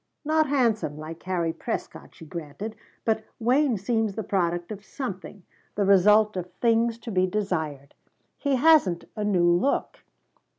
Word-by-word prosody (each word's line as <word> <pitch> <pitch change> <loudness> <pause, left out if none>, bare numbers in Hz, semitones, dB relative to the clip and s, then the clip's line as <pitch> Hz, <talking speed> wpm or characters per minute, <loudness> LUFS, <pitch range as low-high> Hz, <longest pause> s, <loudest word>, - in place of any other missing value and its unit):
"Not 310 0 +2
handsome, 230 - +1
like 160 +2 -8
Harry 175 -3 -1
Prescott," - - -6
she 160 - -12
granted, 170 +7 -7 0.3
"but 220 -1 +1 0.2
Wayne 250 +1 +2
seems 220 0 -1
the 220 - -3
product 175 -2 -1
of 205 -1 -7
something 200 -5 -7 0.3
the 200 - +1
result 210 +2 +5
of 180 -1 -5
things 230 0 +1
to 230 0 -8
be 185 -1 +2
desired. 160 -8 -3 0.4
He 280 -1 0
hasn't 260 - +4
a 210 - -3
new 185 -4 +2
look." 175 +11 0
205 Hz, 145 wpm, -26 LUFS, 175-230 Hz, 0.4 s, result